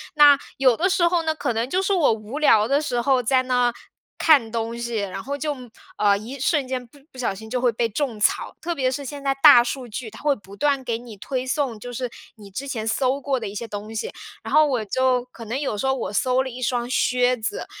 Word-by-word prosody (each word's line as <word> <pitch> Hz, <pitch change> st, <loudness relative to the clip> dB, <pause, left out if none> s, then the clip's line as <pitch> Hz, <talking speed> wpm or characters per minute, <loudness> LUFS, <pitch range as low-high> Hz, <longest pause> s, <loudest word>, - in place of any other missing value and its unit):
那， 290 Hz, -1 st, +8 dB, 0.2 s
有 260 Hz, -3 st, +4 dB
的 365 Hz, -, +2 dB
时 370 Hz, -2 st, +3 dB
候 340 Hz, -1 st, +1 dB
呢， 320 Hz, -1 st, 0 dB
可 290 Hz, -6 st, -2 dB
能 230 Hz, +2 st, -1 dB
就 370 Hz, +6 st, +1 dB
是 390 Hz, +1 st, +1 dB
我 330 Hz, -10 st, +4 dB
无 220 Hz, +6 st, -7 dB
聊 220 Hz, -8 st, +4 dB
的 280 Hz, +3 st, +2 dB
时 245 Hz, -5 st, -1 dB
候 255 Hz, 0 st, +2 dB
在 255 Hz, +2 st, +3 dB
那 245 Hz, -1 st, +1 dB, 0.5 s
看 275 Hz, -9 st, +4 dB
东 230 Hz, 0 st, -3 dB
西。 235 Hz, 0 st, -4 dB
然 195 Hz, -2 st, -4 dB
后 280 Hz, +1 st, -4 dB
就， 295 Hz, +1 st, -2 dB, 0.4 s
呃， 200 Hz, -1 st, +3 dB
一 240 Hz, +7 st, -8 dB
瞬 290 Hz, 0 st, +1 dB
间 255 Hz, -1 st, -3 dB
不 285 Hz, -, -20 dB
不 -, -, -16 dB
小 245 Hz, -5 st, -1 dB
心 220 Hz, +3 st, -10 dB
就 250 Hz, +2 st, -1 dB
会 245 Hz, -1 st, +2 dB
被 230 Hz, +1 st, -1 dB
种 235 Hz, -1 st, -3 dB
草。 210 Hz, -, +1 dB
特 345 Hz, +1 st, -2 dB
别 260 Hz, -3 st, +1 dB
是 280 Hz, +2 st, -4 dB
现 280 Hz, +1 st, -7 dB
在 275 Hz, -1 st, +2 dB
大 285 Hz, -6 st, +9 dB
数 245 Hz, +1 st, -4 dB
据， 225 Hz, +1 st, -6 dB
它 220 Hz, -, -13 dB
会 290 Hz, -2 st, +2 dB
不 200 Hz, -3 st, -14 dB
断 280 Hz, +4 st, +1 dB
给 235 Hz, -2 st, -2 dB
你 235 Hz, -3 st, -11 dB
推 255 Hz, +5 st, -3 dB
送， 260 Hz, -4 st, -1 dB
就 245 Hz, +3 st, -8 dB
是 245 Hz, 0 st, -3 dB, 0.3 s
你 210 Hz, -3 st, -13 dB
之 260 Hz, +9 st, -6 dB
前 225 Hz, -5 st, -4 dB
搜 260 Hz, +3 st, +1 dB
过 275 Hz, -2 st, -1 dB
的 220 Hz, -, -5 dB
一 200 Hz, -, -7 dB
些 230 Hz, +2 st, -5 dB
东 210 Hz, +1 st, -7 dB
西。 220 Hz, -, -3 dB, 0.3 s
然 -, -, -6 dB
后 310 Hz, 0 st, +6 dB
我 250 Hz, -6 st, -1 dB
就 250 Hz, +3 st, +1 dB
可 235 Hz, -2 st, -12 dB
能 235 Hz, +5 st, -3 dB
有 270 Hz, -7 st, -2 dB
时 235 Hz, -, -2 dB
候 265 Hz, -, +2 dB
我 205 Hz, -6 st, -4 dB
搜 255 Hz, +4 st, +2 dB
了 265 Hz, -, -5 dB
一 255 Hz, 0 st, -9 dB
双 245 Hz, -1 st, -1 dB
靴 250 Hz, 0 st, +2 dB
子， 220 Hz, -1 st, -4 dB
250 Hz, 275 characters per minute, -23 LUFS, 225-275 Hz, 0.5 s, 大